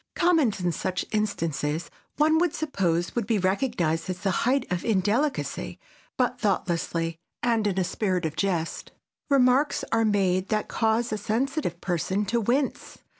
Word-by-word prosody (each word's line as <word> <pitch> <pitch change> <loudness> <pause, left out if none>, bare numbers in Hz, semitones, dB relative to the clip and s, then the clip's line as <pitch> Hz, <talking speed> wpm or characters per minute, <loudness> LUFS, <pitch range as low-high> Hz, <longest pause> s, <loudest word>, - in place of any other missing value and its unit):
Comment 325 - +3
in 180 -1 0
such 180 +3 -2
instances 165 -7 -1 0.3
one 315 +1 +4
would 350 -2 +1
suppose 180 - 0
would 235 -4 -2
be 225 -2 +2
recognized 185 -5 0
as 180 -1 -4
the 195 -1 +1
height 255 +8 +1
of 180 -1 -1
indelicacy, 225 +7 0 0.4
but 250 -3 +1
thoughtlessly, 170 -4 -1 0.2
and 230 -3 +2
in 195 -2 -1
a - - +2
spirit 185 -1 -1
of 155 -1 -3
jest, 175 -5 -2 0.4
remarks 275 +1 +3
are 225 0 +3
made 195 -3 +2
that 215 -1 0
cause 225 +1 +1
a 215 - -2
sensitive 230 - -1
person 190 +3 -1
to 230 +4 0
wince. 255 +6 -1
205 Hz, 150 wpm, -26 LUFS, 180-245 Hz, 0.4 s, one